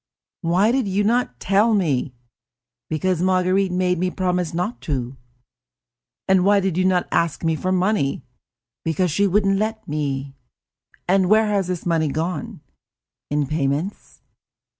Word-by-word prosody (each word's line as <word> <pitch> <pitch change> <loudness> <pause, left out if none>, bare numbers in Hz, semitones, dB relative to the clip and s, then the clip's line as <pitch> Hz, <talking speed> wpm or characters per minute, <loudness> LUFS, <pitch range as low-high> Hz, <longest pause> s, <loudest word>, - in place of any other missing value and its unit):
"I." - - -3
"Why 190 +6 +3
did 255 -3 0
you 195 +2 0
not 225 - 0
tell 210 +4 +3
me?" 145 -9 0 0.7
"Because 175 +2 0
Marguerite 185 +1 +2
made 180 -1 0
me 185 +1 +1
promise 180 -2 -1
not 180 +7 -3
to." 130 -3 -3 1.1
"And 190 -1 +4
why 200 +1 +4
did 190 -3 -1
you 185 +1 +1
not 185 -1 +2
ask 170 -3 0
me 160 -1 +1
for 185 +4 -2
money?" 185 -8 0 0.6
"Because 165 +2 0
she 200 +6 +2
wouldn't 195 0 +2
let 220 +1 -3
me." 140 -2 -3 0.7
"And 185 0 +3
where 220 +1 +5
has 200 -3 0
this 180 -2 -4
money 165 -2 +1
gone?" 160 +2 -3 0.7
"In 145 0 0
payments." 150 +5 -3
180 Hz, 145 wpm, -22 LUFS, 160-195 Hz, 1.1 s, where